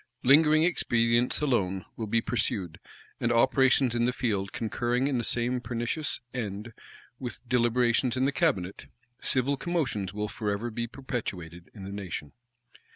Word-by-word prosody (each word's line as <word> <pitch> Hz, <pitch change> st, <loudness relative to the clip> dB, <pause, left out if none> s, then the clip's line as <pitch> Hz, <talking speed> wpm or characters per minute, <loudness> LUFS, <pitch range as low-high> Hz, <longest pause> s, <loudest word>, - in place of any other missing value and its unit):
Lingering 155 Hz, +3 st, +6 dB
expedients 120 Hz, -8 st, +2 dB
alone 95 Hz, -10 st, 0 dB
will 110 Hz, -, -4 dB
be 115 Hz, +2 st, +2 dB
pursued; 100 Hz, -8 st, -1 dB, 0.4 s
and 120 Hz, -, +1 dB
operations 130 Hz, +1 st, +4 dB
in 120 Hz, 0 st, +1 dB
the 125 Hz, -, +2 dB
field 105 Hz, -7 st, -1 dB
concurring 120 Hz, +3 st, -1 dB
in 135 Hz, -4 st, 0 dB
the -, -, -2 dB
same 125 Hz, +2 st, 0 dB
pernicious 120 Hz, +5 st, -2 dB
end 110 Hz, -2 st, -4 dB, 0.5 s
with 125 Hz, -1 st, -7 dB
deliberations 120 Hz, +1 st, +2 dB
in 130 Hz, -, +2 dB
the 140 Hz, -, +2 dB
cabinet, 130 Hz, -, -1 dB, 0.3 s
civil 135 Hz, +2 st, +1 dB
commotions 135 Hz, -, -1 dB
will 105 Hz, +1 st, -3 dB
forever 105 Hz, +2 st, -3 dB
be 115 Hz, +1 st, -3 dB
perpetuated 95 Hz, -, -6 dB
in 100 Hz, -, -9 dB
the 95 Hz, -, -6 dB
nation. 95 Hz, -7 st, -5 dB
120 Hz, 145 wpm, -28 LUFS, 105-130 Hz, 0.5 s, Lingering